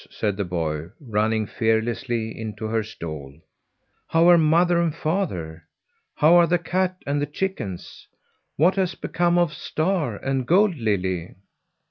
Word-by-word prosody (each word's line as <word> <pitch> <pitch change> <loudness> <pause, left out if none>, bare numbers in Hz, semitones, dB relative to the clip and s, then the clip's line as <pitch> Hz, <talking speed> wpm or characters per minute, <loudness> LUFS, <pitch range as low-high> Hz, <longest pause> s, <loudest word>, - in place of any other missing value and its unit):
said 105 -2 -2
the 100 - -2
boy, 80 -3 -3
running 110 -3 0
fearlessly 115 +1 -1
into 110 -1 -6
her 110 +1 0
stall. 75 -9 -8 0.7
"How 165 +1 +4
are 175 - +7
mother 170 +2 +3
and 165 -2 0
father? 90 - -3 0.5
How 155 +3 +5
are 170 -1 +5
the 175 - +3
cat 185 +2 -1
and 145 0 -1
the 145 - -1
chickens? 145 - -5 0.5
What 180 +6 +3
has 185 -2 0
become 175 0 0
of 175 -3 +2
Star 155 - -1
and 135 +3 -2
Gold 190 +1 +4
Lily?" 95 - -2
130 Hz, 140 wpm, -23 LUFS, 105-170 Hz, 0.7 s, are